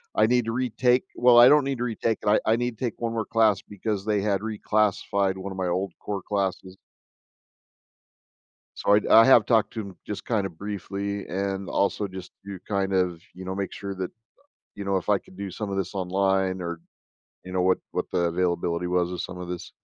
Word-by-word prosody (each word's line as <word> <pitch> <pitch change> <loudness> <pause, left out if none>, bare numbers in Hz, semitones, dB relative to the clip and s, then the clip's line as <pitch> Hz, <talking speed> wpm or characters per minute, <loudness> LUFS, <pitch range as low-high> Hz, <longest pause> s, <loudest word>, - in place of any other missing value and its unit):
I - - +4
need 125 -1 +2
to 115 - -2
retake. 125 +1 +1
Well, 120 -1 +6
I 120 - +9
don't 150 -1 +6
need 135 -2 -2
to - - -1
retake 115 -1 -1
it. - - -6
I 105 - +5
I 110 - +4
need 120 -2 -2
to 130 - -2
take 120 - -5
1 115 -1 -1
more 115 -1 -1
class 110 -4 +2
because 105 0 -4
they 105 -2 +1
had 100 -2 0
reclassified 105 -2 0
1 95 +1 -6
of 95 - -7
my 95 -1 -1
old 95 +2 -1
core 100 -2 -4
classes. 95 -1 -2 2.0
So 100 - +2
I'd 105 - +3
I 115 - +8
have 120 -5 +6
talked 110 -3 +2
to 110 - -3
him 100 -3 -10
just, 105 - -6
kinda, 100 -5 0
briefly 100 +2 -5
and 95 +1 -3
also 100 +1 0
just 95 -1 -9
to 100 -2 -7
kind 100 -1 -1
of, 90 -3 0
you 95 +1 -9
know, 95 0 -4
make 100 -1 -3
sure 100 -1 -6
that, 95 -1 -4 0.6
you 100 -1 -6
know, 100 -1 +1
if 90 - -5
I 100 - +4
could 95 - -19
do 100 -2 -5
some 105 +1 -5
of 95 - -2
this 95 +1 -2
online 95 0 0
or 85 -1 -5 0.6
you 90 - -8
know, 90 -1 +1
what 95 0 +3
what - - -3
the - - 0
availability 85 -1 0
was 90 0 +1
of 90 - -4
some - - -7
of 90 -1 -7
this. 90 -1 -6
100 Hz, 220 wpm, -25 LUFS, 95-110 Hz, 2.0 s, I